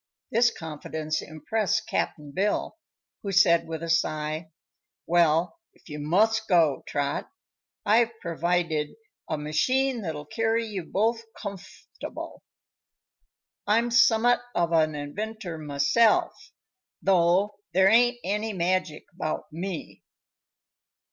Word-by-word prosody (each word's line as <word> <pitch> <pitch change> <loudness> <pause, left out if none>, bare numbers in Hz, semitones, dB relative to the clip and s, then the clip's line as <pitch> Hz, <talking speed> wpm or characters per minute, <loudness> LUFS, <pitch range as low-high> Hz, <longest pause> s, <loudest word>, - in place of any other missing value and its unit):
This 235 +1 +4
confidence 155 -2 -4
impressed 215 +7 -1
Cap'n 150 -3 -2
Bill, 200 +7 -1 0.5
who 200 - -4
said 175 -4 +4
with 160 0 -5
a 165 - -4
sigh: 155 0 -1 0.6
"Well, 170 - +2 0.2
if - - -23
you 150 0 -6
must 220 +9 +2
go, 165 -7 +3
Trot, 140 -1 -2 0.6
I've 230 +2 +3
pervided 170 -2 -1 0.3
a 155 - -1
machine 245 - +1
that'll 155 -5 -5
carry 225 +7 0
you 200 -6 -5
both 225 +6 0 0.2
comf'table. 200 -3 -8 1.3
I'm 230 +3 +2
summat 240 0 +5 0.2
of 170 -1 +1
an 155 -2 +2
inventor 180 +4 -5
myself, 150 +10 +2 0.5
though 190 +3 +3
there 190 +1 +4
ain't 240 +2 +4
any 210 +3 -2
magic 180 -3 -1
about 155 -2 -4
me." 175 0 -6
180 Hz, 110 wpm, -26 LUFS, 155-220 Hz, 1.3 s, summat